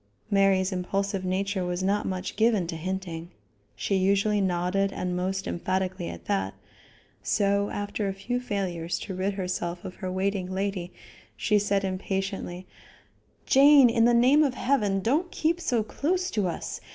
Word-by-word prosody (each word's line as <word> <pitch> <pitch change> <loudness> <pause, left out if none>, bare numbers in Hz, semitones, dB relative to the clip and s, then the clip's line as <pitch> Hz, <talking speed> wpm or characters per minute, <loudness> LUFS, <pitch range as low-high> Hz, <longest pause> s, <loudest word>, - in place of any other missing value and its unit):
Mary's 195 -1 +3
impulsive 195 +1 -2
nature 190 +1 -1
was 180 +1 -2
not 200 +2 +1
much 185 0 -4
given 220 -4 +3
to 165 - -5
hinting 175 -1 -4 0.5
she - - -2
usually 200 +2 +2
nodded 190 +2 +1
and 180 -2 -3
most 190 +2 -2
emphatically 185 0 -2
at 85 - -9
that 95 0 -1 0.7
so 200 0 +1
after 205 0 -3
a 195 - -1
few 245 +6 -2
failures 180 -7 -2
to 195 - -6
rid 190 +2 -1
herself 180 -1 -3
of 185 - -6
her 185 -1 -4
waiting 190 0 -1
lady 190 -2 -2 0.5
she 210 -2 +2
said 200 -1 +1
impatiently: 190 -1 -3 0.8
"Jane, 275 -2 +7
in 230 -1 +3
the 240 - +5
name 260 +6 +5
of 270 -3 0
heaven 210 -9 +1
don't 300 - +1
keep 335 +2 0
so 245 -9 +1
close 360 - -1
to 205 -4 0
us. 170 - -5
195 Hz, 155 wpm, -27 LUFS, 185-210 Hz, 0.8 s, Jane